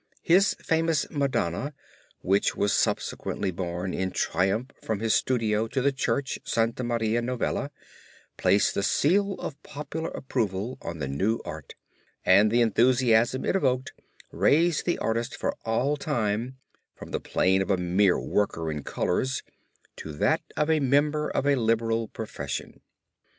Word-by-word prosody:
His 190 +4 +4
famous 165 -2 0
Madonna 140 - -1 0.5
which 100 +2 +1
was 100 0 +1
subsequently 95 - -1
borne 90 +1 -4
in 95 0 -1
triumph 100 +9 0
from 110 -2 -2
his 115 0 +1
studio 115 -3 +1
to 130 - -2
the 140 +2 +2
Church 135 0 -1
of - - -22
Santa 115 +2 0
Maria 115 -1 0
Novella, 125 0 -2 0.7
placed 100 - +3
the - - -1
seal 195 - +2
of 145 - -7
popular 155 +3 -5
approval 115 -1 -3
on 85 0 -5
the 70 -3 -3
new 95 +12 0
art, 80 -2 -8 0.5
and 100 +3 +6
the 120 +2 +3
enthusiasm 120 +1 +3
it - - +1
evoked 130 -7 0 0.4
raised 165 +2 +2
the 175 - +1
artist 115 +1 -2
for - - -2
all 125 +6 +1
time 120 -3 -2 0.4
from - - -11
the - - -1
plane 95 +1 +2
of 95 - -3
a 95 - +3
mere 90 +2 +2
worker 80 -6 -1
in 75 -1 -4
colors 130 - -1 0.5
to 80 - -7
that 75 - +1 0.2
of 150 - +2
a 160 - +3
member 145 +2 +2
of - - -1
a 145 - +4
liberal 115 -1 +1
profession. 105 - -6
115 Hz, 150 wpm, -26 LUFS, 100-140 Hz, 0.7 s, and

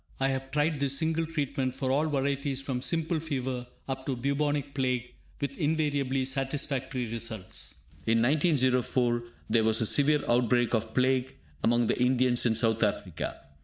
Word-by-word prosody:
I 135 0 +2
have 135 0 -3
tried 150 +1 +1
this 140 -1 +1
single 160 +2 0
treatment 140 -5 -2
for 130 -1 -1
all 150 +4 +2
varieties 140 -1 -1
from 135 -2 -3
simple 160 +4 0
fever 130 -5 -3 0.2
up 130 -1 -4
to 135 - 0
Bubonic 140 +2 -1
Plague, 125 -2 -1 0.3
with 140 -1 -3
invariably 145 -4 0
satisfactory 135 -1 -1
results. 110 -4 -5 0.2
In 115 +1 +4
1904, 130 -4 +2 0.2
there 115 - +3
was 110 0 +3
a 110 - +1
severe 145 +5 +3
outbreak 120 0 +2
of 110 -1 -1
plague 130 0 +2 0.3
among 120 +1 +3
the 120 - 0
Indians 125 -1 +3
in 110 - +2
South 110 0 +2
Africa. 100 -5 -2
130 Hz, 155 wpm, -29 LUFS, 120-140 Hz, 0.3 s, In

